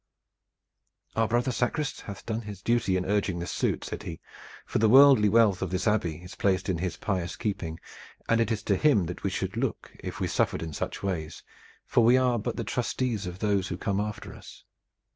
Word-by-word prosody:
"Our 115 0 +2
brother 120 +3 +1
sacrist 135 +4 -1
hath 100 -2 -8
done 110 0 -2
his 105 -3 -9
duty 115 -6 +2
in 90 - -2
urging 100 -3 0
this 85 0 -4
suit," - - -1
said - - -5
he, 80 - -7 0.5
"for - - -1
the 110 0 +4
worldly 130 -4 +7
wealth 110 -3 +4
of - - -1
this 95 0 -1
Abbey 85 -6 0
is 90 - -10
placed 95 -1 0
in 90 -3 0
his 90 0 -3
pious 90 -4 -2
keeping, 85 -6 -3 0.5
and 115 0 +3
it 115 0 0
is 105 -2 -2
to 100 -3 +1
him 130 - +4
that 90 +2 -6
we - - 0
should - - -3
look - - -3
if - - -6
we - - 0
suffered 75 - 0
in 80 -1 -6
such - - -4
ways, 80 -5 -3 0.4
for 120 - +3
we 120 +3 +6
are 125 -2 +2
but 105 - -3
the 115 - -3
trustees 120 -2 -2
of 90 0 -6
those 100 -2 +1
who 90 - -4
come 100 0 -1
after 105 0 -4
us. - - -13
105 Hz, 210 wpm, -27 LUFS, 90-115 Hz, 0.5 s, worldly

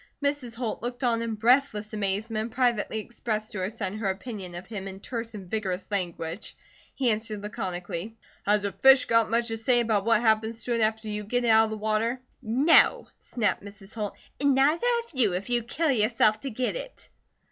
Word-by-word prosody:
Mrs. 280 -5 -1
Holt 235 -2 -3
looked 245 +2 -4
on 230 -2 +2
in 230 -1 -2
breathless 225 -2 +2
amazement 210 +2 -1
and - - -13
privately 240 -4 +1
expressed 215 -1 -4
to 210 - -5
her 185 +1 -1
son 210 -2 -4
her 205 -3 0
opinion 190 -2 -5
of 175 +2 -7
him 195 -2 -6
in 190 0 -8
terse 230 +1 -5
and 195 -3 -8
vigorous 190 -2 -2
language. 175 -1 -4 0.4
He 255 -4 +2
answered 215 -1 -3
laconically: 185 +1 -5 0.3
"Has 205 0 +3
a 200 - -1
fish 265 +7 +6
got 230 -1 +3
much 235 +1 +1
to 225 - -2
say 240 +2 +3
about 220 -4 +1
what 230 0 +3
happens 220 0 +1
to 245 - -1
it 230 - +1
after 220 0 0
you 210 0 -3
get 245 +4 -1
it - - +2
out 220 0 +6
of - - -4
the 220 - -4
water?" 220 +3 0 0.2
"No!" 260 +8 +4
snapped 210 -5 -1
Mrs. 200 0 -12
Holt, 210 -2 -4 0.2
"and 280 -1 +3
neither 300 - +3 0.2
have 470 - -19
you, 235 -8 +2
if 195 +6 -4
you 240 0 +2
kill 295 +7 0
yourself 215 -2 +3
to 270 - -5
get 255 - -2
it." - - -8
220 Hz, 205 wpm, -27 LUFS, 205-240 Hz, 0.4 s, fish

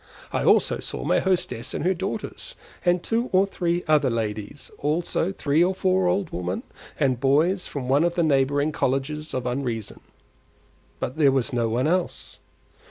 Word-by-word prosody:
I - - 0
also - - +4
saw - - -5
my - - +3
hostess 175 -10 -1
and - - -2
her 185 - +3
daughters 205 - -5 0.3
and 175 -1 +2
two 235 +2 0
or 190 +1 +4
three 175 -3 -1
other 155 -3 +4
ladies; 110 +2 -4
also 165 +4 0
three 155 -3 +2
or 185 +1 +1
four 185 -1 +2
old 180 -1 0
women 90 +1 -3 0.4
and 130 -2 +2
the - - -17
boys 155 +8 +2
from 135 -3 -5
one 140 +4 +3
of 175 0 +1
the 170 - +2
neighbouring 145 0 +2
Colleges 150 +3 -1
of 130 -1 -2
Unreason; 125 -4 -3 1.0
but 130 - -4
there 145 -4 +5
was 130 -3 0
no 120 -2 +1
one 120 +3 0
else. 175 +2 -1
150 Hz, 170 wpm, -24 LUFS, 130-180 Hz, 1.0 s, there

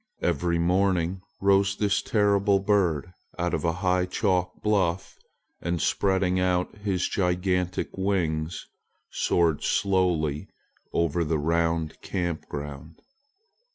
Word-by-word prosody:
Every 85 0 +1
morning 90 +1 +1 0.2
rose 100 0 +3
this 105 0 +1
terrible 100 -2 +2
red 95 - -6
bird 90 -5 +1 0.2
out 90 0 -1
of - - -1
a 85 - +2
high 90 0 +2
chalk 90 -2 0
bluff 95 -4 0 0.5
and 85 0 -1
spreading 95 +1 +1
out 90 +1 0
his 95 -3 -1
gigantic 90 -1 -1
wings 85 -5 -1 0.5
soared 85 -4 +1
slowly 90 -7 +1 0.4
over 85 0 +1
the 80 0 0
round 80 +1 0
camp 85 -3 -3
ground. 75 +2 -7
90 Hz, 115 wpm, -26 LUFS, 85-95 Hz, 0.5 s, rose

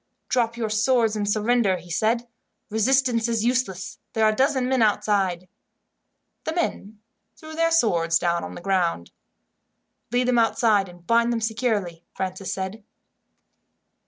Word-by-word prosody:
"Drop 235 -2 0
your 225 -2 -2
swords 225 0 +2
and 205 -1 -1
surrender," 215 -2 +2
he 175 0 -12
said. 230 +7 0 0.4
"Resistance 240 +1 +2
is 230 -1 0
useless. 215 -7 -1
There 220 -1 +2
are 215 - +5
a - - -4
dozen 265 0 +1
men 260 -1 +1
outside." 195 -4 +1 1.0
The 320 - -3
men 215 - -3 0.4
threw 315 -1 -11
their 330 +1 +2
swords 170 - +2
down 170 0 0
on - - -7
the - - -8
ground. 175 - -1 1.0
"Lead 245 +1 +1
them 245 -1 +3
outside, 220 -4 +2
and 175 -1 -16
bind 235 +2 +3
them 235 - 0
securely," 220 -7 -2
Francis 185 0 -4
said. 190 +3 -5
220 Hz, 145 wpm, -24 LUFS, 190-240 Hz, 1.0 s, are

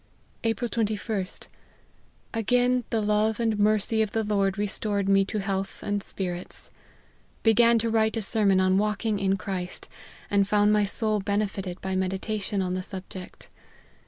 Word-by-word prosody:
" - - -36
April 230 +2 0
21 220 -2 0 0.3
st. - - -7 0.9
Again 245 +2 +2
the 225 - 0
love 210 +1 +1
and 225 -2 0
mercy 215 +1 +3
of 215 -2 -1
the 225 - +1
Lord 200 -2 +1
restored 205 -1 -1
me 195 0 +5
to 215 - -4
health 195 -1 -3
and 205 0 -1
spirits. 180 -2 -3 0.7
Began 230 +1 +5
to 230 +1 0
write 220 0 +2
a - - 0
sermon 195 -2 +4
on 185 +1 +3
walking 210 0 0
in 195 0 +1
Christ, 185 -2 -5 0.4
and 200 -1 +4
fqjund 205 +1 +3
my 210 -1 +3
soul 215 +1 0
benefited 195 -2 -2
by 190 0 -2
meditation 195 +2 -1
on 180 -1 -2
the 185 - -2
subject. 185 0 -9
205 Hz, 160 wpm, -26 LUFS, 195-220 Hz, 0.9 s, me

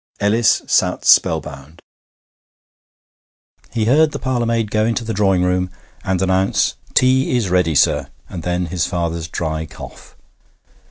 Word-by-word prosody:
Ellis 110 +3 +2
sat - - 0
spell - - +5
bound. 70 +4 -12 1.9
He 115 -3 -1
heard 150 +6 +3
the - - -3
parlourmaid 115 -4 -1
go 110 0 +1
into 115 +2 -1
the 115 0 -4
drawing 95 -3 +2
room 90 0 0 0.3
and 95 -1 -1
announce, 95 +1 +1 0.2
'Tea 130 0 +3
is 110 -6 -1
ready, 90 -4 +1
sir!' - - +2 0.2
and 85 - -7
then 90 +1 -2
his 85 0 -2
father's 85 -2 -3
dry 80 -1 -4
cough. - - -12
95 Hz, 140 wpm, -18 LUFS, 85-115 Hz, 1.9 s, spell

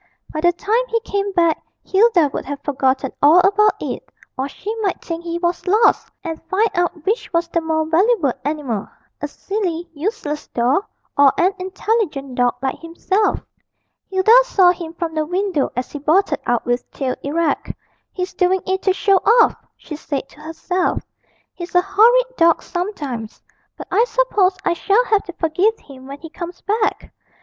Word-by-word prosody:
By 310 - -2
the 350 +1 +4
time 430 +7 0
he 460 -1 0
came 400 -2 -2
back 335 -3 +2 0.2
Hilda 380 -7 +3
would - - -3
have 285 0 -4
forgotten 265 -1 0
all 300 +4 +7
about 410 +3 +3
it, - - -4 0.3
or 265 +2 -3
she 420 +8 -5
might 390 -4 -1
think 335 0 -6
he 340 0 -3
was 345 +1 -2
lost, 425 +5 +3
and 325 -3 -5
find 425 +4 +2
out 350 -3 -1
which 430 +5 -1
was 335 -1 0
the 335 - 0
more 320 -1 0
valuable 335 - +2
animal 275 -8 -3 0.3
a 295 - -2
silly, 350 0 -3
useless 310 -2 -4
doll, 255 - 0 0.3
or 280 -1 +6
an 370 +3 +3
intelligent 370 - -2
dog 245 -1 +1
like 265 - -2
himself. 360 +5 -1 0.7
Hilda 380 +3 +4
saw 375 -7 +5
him 335 -2 -7
from 335 -1 -3
the 310 -1 0
window 360 -2 -1
as 250 +1 -3
he 290 - -6
bolted 315 +1 +2
out 240 -1 +1
with 245 0 -1
tail 260 -2 -3
erect. 310 +2 -1 0.4
'He's 365 0 -4
doing 365 0 +1
it 380 0 -1
to 380 - +2
show 395 0 +3
off,' 460 +5 +3
she 305 - -8
said 285 -2 -4
to - - -19
herself; 355 +4 -2 0.5
'he's 355 0 -8
a 355 - +6
horrid 485 +6 +4
dog 335 0 +4
sometimes. 290 - -5 0.4
But - - -9
I 455 - +4
suppose 410 -8 +1
I - - +3
shall 410 +7 +2
have 420 -4 +2
to 355 - -8
forgive 360 +7 +1
him 265 -2 -14
when 280 +1 -8
he 325 -1 -10
comes 345 +1 -7
back!' 425 +1 -1
345 Hz, 175 wpm, -19 LUFS, 300-395 Hz, 0.7 s, all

